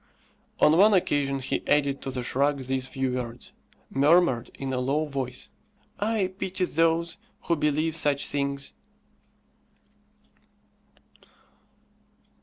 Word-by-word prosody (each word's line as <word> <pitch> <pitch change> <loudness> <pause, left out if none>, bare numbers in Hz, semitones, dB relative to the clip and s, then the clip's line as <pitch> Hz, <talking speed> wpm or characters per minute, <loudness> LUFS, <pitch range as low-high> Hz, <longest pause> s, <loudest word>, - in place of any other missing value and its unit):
On 155 +2 +5
one 210 +1 +6
occasion 145 -6 +1
he 135 - -2
added 140 -2 +2
to - - -5
the 130 -1 -3
shrug 140 +2 0
these 130 0 -2
few 135 -1 -2
words, 125 -1 -5 0.4
murmured 140 -3 +3
in 135 -1 -4
a 125 - 0
low 140 +5 0
voice, 135 -4 -5 0.5
"I 205 -3 0
pity 185 0 -1
those 165 +1 +1 0.2
who 170 - 0
believe 155 +1 0
such 145 -3 +3
things." 140 -1 -2
140 Hz, 110 wpm, -26 LUFS, 135-165 Hz, 0.5 s, one